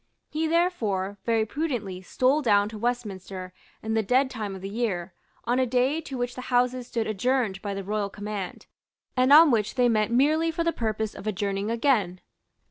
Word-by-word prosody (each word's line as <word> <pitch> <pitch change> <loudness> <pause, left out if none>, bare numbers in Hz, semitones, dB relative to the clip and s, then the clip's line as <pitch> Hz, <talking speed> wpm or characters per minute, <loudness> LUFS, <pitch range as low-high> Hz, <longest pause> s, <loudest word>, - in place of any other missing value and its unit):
He 315 +1 0
therefore, 220 - 0
very 225 -2 +2
prudently, 220 - -3
stole 255 +10 +1
down 205 -5 +3
to 220 - -8
Westminster, 195 -6 -4 0.3
in 220 0 -2
the 220 - +2
dead 260 +6 +2
time 210 -5 -4
of 190 - -10
the - - -3
year, 200 -5 -2 0.3
on 245 +2 +1
a 260 - +2
day 255 +6 +1
to 275 -4 -7
which 245 0 -2
the 255 - -7
Houses 250 0 +1
stood 230 -2 -2
adjourned 215 -2 0
by 200 -1 -4
the 195 - -4
royal 205 +1 -2
command, 205 -2 -6 0.5
and 255 +1 +3
on 310 +1 +9
which 215 -1 0
they 250 -2 +4
met 215 -2 +2
merely 300 +7 +3
for 330 +1 -1
the 335 0 +1
purpose 220 -2 -2
of 215 - -9
adjourning 200 0 -1
again. 225 -7 +1
225 Hz, 190 wpm, -26 LUFS, 200-255 Hz, 0.5 s, on